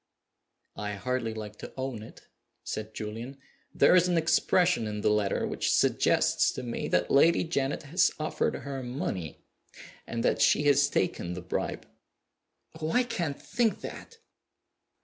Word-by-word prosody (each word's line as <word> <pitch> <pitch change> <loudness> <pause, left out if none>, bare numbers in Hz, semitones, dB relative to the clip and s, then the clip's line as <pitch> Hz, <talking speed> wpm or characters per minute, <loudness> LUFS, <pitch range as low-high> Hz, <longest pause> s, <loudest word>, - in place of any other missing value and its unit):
"I 105 0 -3
hardly 120 +2 -2
like 105 -1 -7
to - - -9
own 130 -4 -4
it," 110 - -13 0.4
said 110 0 -5
Julian. 115 +5 -6 0.3
"There 140 - +5
is 180 0 +5
an 175 -1 +1
expression 165 -4 +2
in 105 0 -4
the - - +2
letter 105 -2 +1
which - - -1
suggests - - +3
to - - -6
me 120 -1 -3
that - - +1
Lady 160 +5 +5
Janet 140 -5 -2
has 170 +6 +2
offered 155 - -1
her 140 -1 -5
money, 120 - -5 0.6
and 115 0 -3
that - - +2
she - - +4
has 140 -1 +4
taken 90 -4 -1
the 90 - -6
bribe." 90 - -3 0.9
"Oh, 155 0 -2
I 250 - +3
can't 175 - -3
think 235 -3 0
that!" 460 - -9
130 Hz, 150 wpm, -28 LUFS, 105-160 Hz, 0.9 s, There